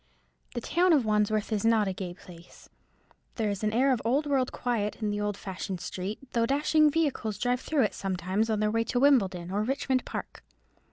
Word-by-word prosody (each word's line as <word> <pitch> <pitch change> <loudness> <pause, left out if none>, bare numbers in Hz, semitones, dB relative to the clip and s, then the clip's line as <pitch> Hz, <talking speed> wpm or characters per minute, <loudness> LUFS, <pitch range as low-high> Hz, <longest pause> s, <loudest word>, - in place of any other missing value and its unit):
The 240 - -2
town 350 +7 +3
of 275 -7 +3
Wandsworth 215 0 +1
is 205 - -1
not 225 -2 +3
a 190 - -1
gay 180 -2 -6
place. 175 -2 -15 0.7
There 215 -3 0
is 200 +1 -5
an 215 - +1
air 260 +5 +3
of 245 - -2
old 265 +7 +1
world 270 -3 +1
quiet 225 -4 -2
in 210 -2 -1
the 205 0 -2
old 205 -1 -2
fashioned 190 -1 -5
street, 185 +4 -5 0.2
though 230 -1 +2
dashing 300 +3 +3
vehicles 280 -9 -1
drive 245 +3 0
through 300 -4 +1
it 210 - 0
sometimes 190 +3 -1
on 215 -1 0
their 210 0 +1
way 230 +1 +1
to 245 - 0
Wimbledon 195 -11 +3
or 205 +2 0
Richmond 260 +2 0
Park. - - -7
215 Hz, 205 wpm, -28 LUFS, 200-255 Hz, 0.7 s, town